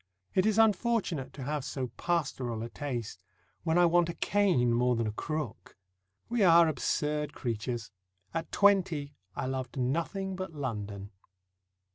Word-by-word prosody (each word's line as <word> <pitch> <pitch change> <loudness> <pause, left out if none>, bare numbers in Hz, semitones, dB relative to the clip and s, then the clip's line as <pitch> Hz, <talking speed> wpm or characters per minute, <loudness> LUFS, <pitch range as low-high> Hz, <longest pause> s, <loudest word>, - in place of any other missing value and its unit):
It 190 +3 +3
is 215 -1 +2
unfortunate 210 - +2
to 135 - -7
have 145 +1 -2
so 130 -2 -3
pastoral 130 -9 -1
a 115 - -5
taste, 125 -7 -5 0.4
when 165 0 +1
I 175 - +6
want 170 0 +4
a 170 - -4
cane 180 -13 +2
more 125 +1 +3
than 115 0 0
a 110 - -1
crook. 150 0 -5 0.5
We 240 -1 0
are 170 -2 +7
absurd 150 -1 -1
creatures; 115 -1 -3 0.4
at 165 0 -3
twenty 180 -8 +3 0.2
I - - -2
loved 130 +1 -4
nothing 170 +9 -1
but 185 -2 -5
London. 105 -7 -4
150 Hz, 145 wpm, -30 LUFS, 125-175 Hz, 0.5 s, are